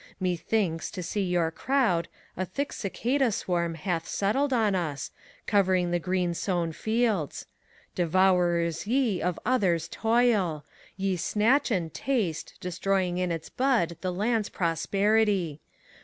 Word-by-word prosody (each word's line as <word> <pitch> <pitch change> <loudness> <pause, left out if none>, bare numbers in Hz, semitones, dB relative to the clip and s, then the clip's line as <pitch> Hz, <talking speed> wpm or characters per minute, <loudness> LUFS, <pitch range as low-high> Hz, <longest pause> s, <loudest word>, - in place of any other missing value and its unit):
Methinks, 180 -1 -1
to 180 - -6
see 205 +4 -2
your 175 -3 +1
crowd, 190 -6 +1 0.3
a 185 - -2
thick 275 +11 -3
cicada 245 +5 0
swarm 170 -4 -1
Hath 165 0 -2
settled 265 +8 0
on 220 -5 +2
us, 160 -6 -2 0.3
covering 185 -4 +2
the 175 - +1
green 180 0 0
sown 170 -2 -1
fields. 220 - -1 0.5
Devourers 175 -1 +2
ye 235 -6 +1
of 180 0 -1
others' 185 -9 +2
toil! 215 -8 +1 0.3
Ye 190 -1 0
snatch 230 - +2
and 175 -8 -1
taste. 220 - -2
Destroying 180 0 -1
in 180 -1 0
its 165 -1 -4
bud 245 -11 +1
the 185 - -1
land's 210 +3 0
prosperity! 195 -1 +1
185 Hz, 125 wpm, -27 LUFS, 170-220 Hz, 0.5 s, on